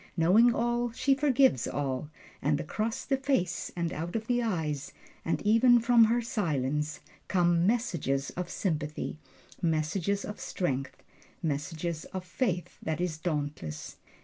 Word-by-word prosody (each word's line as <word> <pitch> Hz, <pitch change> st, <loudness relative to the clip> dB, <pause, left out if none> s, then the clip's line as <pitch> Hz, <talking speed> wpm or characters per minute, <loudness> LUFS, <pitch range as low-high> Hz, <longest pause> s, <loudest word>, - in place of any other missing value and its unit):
Knowing 200 Hz, +9 st, +6 dB
all, 240 Hz, +1 st, 0 dB
she 275 Hz, +3 st, +3 dB
forgives 270 Hz, -, +3 dB
all. 135 Hz, +1 st, -2 dB, 0.3 s
And 145 Hz, 0 st, +1 dB
across 215 Hz, +8 st, -2 dB
the 270 Hz, -, +1 dB
face 255 Hz, -10 st, 0 dB
and 170 Hz, -1 st, -1 dB
out 165 Hz, +5 st, -4 dB
of 220 Hz, -1 st, -1 dB
the 245 Hz, +1 st, +1 dB
eyes, 160 Hz, -, -2 dB, 0.3 s
and 165 Hz, -, 0 dB
even 230 Hz, +3 st, +6 dB
from 235 Hz, 0 st, +6 dB
her 235 Hz, +2 st, +1 dB
silence, 150 Hz, -, -1 dB, 0.3 s
come 175 Hz, -1 st, +3 dB
messages 170 Hz, -, 0 dB
of 180 Hz, 0 st, -4 dB
sympathy 155 Hz, -5 st, -2 dB, 0.4 s
messages 170 Hz, +4 st, 0 dB
of 210 Hz, -, -7 dB
strength, 135 Hz, -6 st, -3 dB, 0.4 s
messages 160 Hz, +2 st, -2 dB
of 185 Hz, -1 st, -6 dB
a -, -, -22 dB
faith 180 Hz, -2 st, -2 dB
that 160 Hz, 0 st, -2 dB
is 175 Hz, -3 st, -2 dB
dauntless. 145 Hz, -, -4 dB
175 Hz, 140 wpm, -29 LUFS, 150-230 Hz, 0.4 s, Knowing